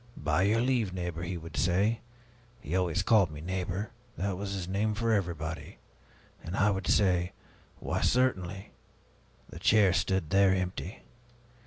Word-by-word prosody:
'By -, -, +1 dB
your 105 Hz, +4 st, +3 dB
leave, 120 Hz, -7 st, +1 dB
neighbor,' 90 Hz, -2 st, -4 dB
he 90 Hz, +1 st, -3 dB
would 85 Hz, 0 st, -9 dB
say. 100 Hz, +6 st, +1 dB, 0.6 s
He 75 Hz, +4 st, -4 dB
always 90 Hz, +1 st, +1 dB
called 100 Hz, -3 st, +4 dB
me 75 Hz, -1 st, -9 dB
'neighbor'; 95 Hz, +4 st, -3 dB, 0.3 s
that 100 Hz, 0 st, -1 dB
was 100 Hz, +1 st, -4 dB
his 95 Hz, -3 st, -4 dB
name 105 Hz, +3 st, 0 dB
for 115 Hz, +1 st, +1 dB
everyone. 85 Hz, -5 st, -3 dB, 0.7 s
And 85 Hz, +4 st, -5 dB
I 105 Hz, +1 st, +4 dB
would 95 Hz, -1 st, -3 dB
say, 90 Hz, -3 st, +2 dB, 0.4 s
'Why, -, -, -2 dB
certainly.' 100 Hz, -7 st, 0 dB, 0.8 s
The -, -, -9 dB
chair 100 Hz, -4 st, +4 dB
stood 95 Hz, -3 st, 0 dB
there, 95 Hz, 0 st, +5 dB
empty. 95 Hz, +2 st, -4 dB
95 Hz, 150 wpm, -30 LUFS, 90-100 Hz, 0.8 s, there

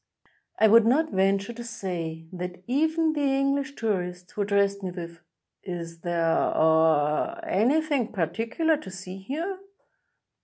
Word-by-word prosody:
I 220 Hz, -, +5 dB
would 225 Hz, +1 st, +6 dB
not 310 Hz, +7 st, +2 dB
venture 195 Hz, +3 st, +1 dB
to 240 Hz, +1 st, -8 dB
say 170 Hz, -8 st, -5 dB
that 180 Hz, 0 st, -6 dB
even 315 Hz, -, +1 dB
the 300 Hz, -, -2 dB
English 275 Hz, 0 st, +1 dB
tourist, 180 Hz, -5 st, -3 dB
who 210 Hz, -, -4 dB
addressed 200 Hz, 0 st, +1 dB
me 190 Hz, -, -3 dB
with: 170 Hz, -2 st, -8 dB, 0.4 s
''Is 170 Hz, -3 st, -6 dB
there 175 Hz, -1 st, -1 dB
— -, -, +2 dB, 0.3 s
aw 160 Hz, -, +3 dB
— 340 Hz, -1 st, -11 dB
any 280 Hz, -, +2 dB
thing 280 Hz, -8 st, -1 dB
particular 225 Hz, -, 0 dB
to 285 Hz, -, -9 dB
see 185 Hz, 0 st, -8 dB
here?" 330 Hz, -, -4 dB
200 Hz, 150 wpm, -26 LUFS, 175-275 Hz, 0.4 s, would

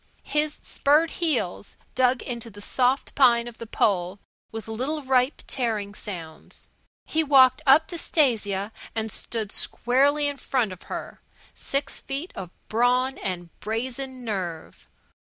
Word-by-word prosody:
His 300 Hz, 0 st, 0 dB
spurred 305 Hz, +4 st, +3 dB
heels 245 Hz, -, -1 dB, 0.2 s
dug 255 Hz, 0 st, +3 dB
into 235 Hz, -2 st, -5 dB
the 205 Hz, -1 st, -12 dB
soft 255 Hz, +5 st, +1 dB
pine 240 Hz, -3 st, +5 dB
of 240 Hz, -, -10 dB
the 230 Hz, -, -7 dB
pole 185 Hz, -3 st, +1 dB, 0.3 s
with 225 Hz, 0 st, -6 dB
little 265 Hz, +7 st, -2 dB
ripe, 260 Hz, +1 st, +2 dB
tearing 220 Hz, -5 st, -1 dB
sounds. 170 Hz, -7 st, -7 dB, 0.4 s
He 320 Hz, +1 st, +1 dB
walked 270 Hz, -4 st, +6 dB
up 290 Hz, +4 st, +7 dB
to 345 Hz, -, -4 dB
Stasia 215 Hz, -, +1 dB, 0.2 s
and 220 Hz, -1 st, -1 dB
stood 220 Hz, -1 st, -4 dB
squarely 285 Hz, +4 st, +2 dB
in 285 Hz, -1 st, -3 dB
front 250 Hz, -6 st, 0 dB
of 185 Hz, -, -9 dB
her, -, -, -6 dB, 0.3 s
six 275 Hz, +1 st, -2 dB
feet 280 Hz, +6 st, -4 dB
of 180 Hz, -, -6 dB, 0.2 s
brawn 250 Hz, +3 st, +2 dB
and 175 Hz, -3 st, -4 dB
brazen 255 Hz, +3 st, -4 dB
nerve. 180 Hz, -7 st, -5 dB
245 Hz, 140 wpm, -25 LUFS, 210-275 Hz, 0.4 s, up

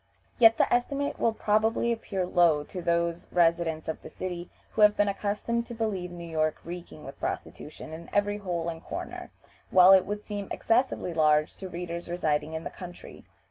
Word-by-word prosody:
Yet 225 Hz, -1 st, +7 dB
the -, -, +2 dB
estimate 280 Hz, +4 st, 0 dB
will 230 Hz, -, +3 dB
probably 220 Hz, +2 st, +1 dB
appear 200 Hz, -5 st, -2 dB
low 170 Hz, -4 st, +3 dB
to 180 Hz, +4 st, -7 dB
those 170 Hz, 0 st, 0 dB
residents 165 Hz, -2 st, +2 dB
of 160 Hz, -, -4 dB
the -, -, -10 dB
city 175 Hz, -1 st, -6 dB, 0.2 s
who 220 Hz, -, -1 dB
have 210 Hz, 0 st, +6 dB
been 205 Hz, -, +3 dB
accustomed 210 Hz, +4 st, -1 dB
to 235 Hz, -, -7 dB
believe 205 Hz, -6 st, -2 dB
New 175 Hz, -1 st, -8 dB
York 155 Hz, -1 st, 0 dB
reeking 170 Hz, -3 st, -8 dB
with 135 Hz, -, -10 dB
prostitution 155 Hz, +1 st, -6 dB
in 165 Hz, +1 st, -9 dB
every 205 Hz, 0 st, +1 dB
hole 175 Hz, -4 st, -3 dB
and 165 Hz, -1 st, -5 dB
corner, -, -, -6 dB, 0.4 s
while 185 Hz, 0 st, +8 dB
it 190 Hz, -1 st, +6 dB
will 205 Hz, +1 st, -2 dB
seem 205 Hz, -1 st, -6 dB
excessively 225 Hz, -6 st, 0 dB
large 155 Hz, -1 st, +3 dB
to 190 Hz, -, -7 dB
readers 170 Hz, -1 st, -5 dB
residing 160 Hz, -3 st, -1 dB
in 160 Hz, 0 st, -4 dB
the -, -, -5 dB
country. 175 Hz, -1 st, -11 dB
180 Hz, 180 wpm, -28 LUFS, 170-210 Hz, 0.4 s, while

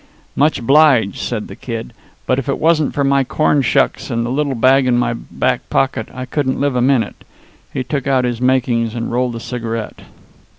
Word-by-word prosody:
"Much 150 Hz, +2 st, +2 dB
obliged," 130 Hz, -5 st, +4 dB
said 110 Hz, -3 st, -3 dB
the -, -, -10 dB
Kid, 115 Hz, -1 st, -6 dB, 0.3 s
"but 130 Hz, -, +1 dB
if 135 Hz, -, -5 dB
it 140 Hz, -, 0 dB
wasn't 155 Hz, -2 st, +2 dB
for 140 Hz, -, -1 dB
my 140 Hz, 0 st, +3 dB
corn 145 Hz, +2 st, +1 dB
shucks 130 Hz, -, +1 dB
and 115 Hz, 0 st, -1 dB
the 120 Hz, -, -3 dB
little 140 Hz, 0 st, -1 dB
bag 130 Hz, +2 st, +4 dB
in 120 Hz, -1 st, +3 dB
my 120 Hz, -1 st, +1 dB
back 125 Hz, +2 st, -2 dB
pocket 130 Hz, -5 st, 0 dB
I 130 Hz, 0 st, -6 dB
couldn't 130 Hz, 0 st, -1 dB
live 140 Hz, -2 st, 0 dB
a 125 Hz, -, +1 dB
minute." 130 Hz, -2 st, 0 dB, 0.5 s
He 130 Hz, -, -3 dB
took 140 Hz, +1 st, -3 dB
out 130 Hz, -2 st, +2 dB
his 120 Hz, -1 st, -3 dB
"makings," 120 Hz, -3 st, +1 dB
and 115 Hz, -1 st, -3 dB
rolled 125 Hz, 0 st, -1 dB
a -, -, -5 dB
cigarette. 115 Hz, -2 st, -5 dB
130 Hz, 200 wpm, -17 LUFS, 120-140 Hz, 0.5 s, obliged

